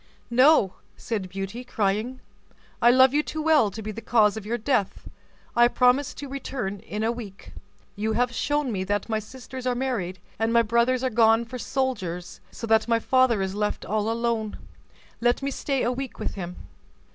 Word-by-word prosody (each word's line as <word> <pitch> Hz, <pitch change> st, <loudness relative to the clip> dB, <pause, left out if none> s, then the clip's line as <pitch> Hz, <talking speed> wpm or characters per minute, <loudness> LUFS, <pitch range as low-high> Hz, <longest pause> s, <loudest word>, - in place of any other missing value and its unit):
"No," 255 Hz, -5 st, +5 dB, 0.2 s
said 205 Hz, -5 st, -4 dB
Beauty, 195 Hz, +6 st, -5 dB
crying, 220 Hz, +2 st, -1 dB, 0.6 s
"I 240 Hz, -, +7 dB
love 260 Hz, +1 st, +6 dB
you 295 Hz, -, +3 dB
too 315 Hz, -, -6 dB
well 305 Hz, -9 st, +4 dB
to 220 Hz, +3 st, -8 dB
be 215 Hz, -, -4 dB
the 225 Hz, -, -7 dB
cause 215 Hz, -4 st, +3 dB
of 215 Hz, -2 st, -7 dB
your 235 Hz, +2 st, -1 dB
death; 235 Hz, -4 st, -1 dB, 0.5 s
I 240 Hz, 0 st, +6 dB
promise 250 Hz, +3 st, +2 dB
to 285 Hz, -, -7 dB
return 250 Hz, -7 st, -4 dB
in 210 Hz, +3 st, -5 dB
a 225 Hz, -, +2 dB
week. 215 Hz, -5 st, -9 dB, 0.4 s
You 215 Hz, +2 st, -1 dB
have 245 Hz, +2 st, +1 dB
shown 290 Hz, 0 st, 0 dB
me 190 Hz, -3 st, -2 dB
that 205 Hz, +3 st, -1 dB
my 220 Hz, -1 st, 0 dB
sisters 255 Hz, +3 st, -8 dB
are 250 Hz, -, +1 dB
married, 235 Hz, -9 st, -2 dB, 0.2 s
and 225 Hz, +1 st, +1 dB
my 235 Hz, 0 st, +5 dB
brothers 235 Hz, +3 st, +2 dB
are 260 Hz, -, 0 dB
gone 225 Hz, +1 st, +4 dB
for 250 Hz, +2 st, -7 dB
soldiers, 205 Hz, -11 st, -3 dB
so -, -, -7 dB
that 220 Hz, 0 st, +3 dB
my 230 Hz, -1 st, +3 dB
father 240 Hz, -3 st, +3 dB
is 190 Hz, 0 st, -3 dB
left 210 Hz, +1 st, -2 dB
all 215 Hz, +1 st, 0 dB
alone. 230 Hz, -2 st, -1 dB, 0.6 s
Let 240 Hz, +3 st, +1 dB
me 275 Hz, -, -1 dB
stay 275 Hz, 0 st, -1 dB
a 240 Hz, -, +1 dB
week 265 Hz, 0 st, -5 dB
with -, -, -3 dB
him." 180 Hz, -2 st, -6 dB
235 Hz, 190 wpm, -25 LUFS, 210-255 Hz, 0.6 s, I